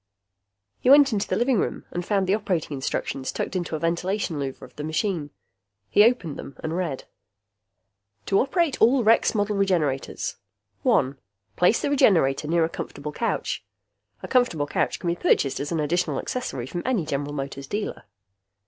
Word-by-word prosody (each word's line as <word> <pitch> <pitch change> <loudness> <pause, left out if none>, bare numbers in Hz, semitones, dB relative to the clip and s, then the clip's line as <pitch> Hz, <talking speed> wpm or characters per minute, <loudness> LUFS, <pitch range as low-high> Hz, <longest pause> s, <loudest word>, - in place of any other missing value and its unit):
He - - +1
went 280 -2 +7
into 205 -1 0
the - - 0
living 240 -2 +2
room - - -2
and 175 - -3
found 195 +1 +1
the 190 - +2
operating 185 -8 -1
instructions 135 0 -3
tucked - - -4
into 175 -3 -2
a - - -3
ventilation 170 +1 -1
louver 135 -1 -5
of 125 - -13
the 150 - -6
machine. 160 0 -1 0.6
He 205 - +7
opened 215 - +1
them 140 - -9
and 160 +1 -2
read: 170 -7 -2 1.2
To 195 - +3
Operate 305 +2 +1
All 245 +3 +5
Rex 225 +1 +4
Model 205 0 +1
Regenerators: 165 -9 0 0.4
1. 135 +1 +2 0.4
Place 180 +6 +3
the - - 0
Regenerator 160 - +3
near 165 +1 +3
a - - -1
comfortable 150 -2 -6
couch. 230 +9 -2 0.6
(A - - -4
comfortable 245 - +2
couch - - -1
can 180 - -6
be 170 - +1
purchased 135 -5 +2
as 145 +3 -4
an 165 - 0
additional 170 +4 0
accessory 190 - -3
from 175 +7 -4
any 235 -11 0
General 145 -1 -3
Motors 140 -1 -5
dealer.) 210 - -4
175 Hz, 170 wpm, -25 LUFS, 145-210 Hz, 1.2 s, went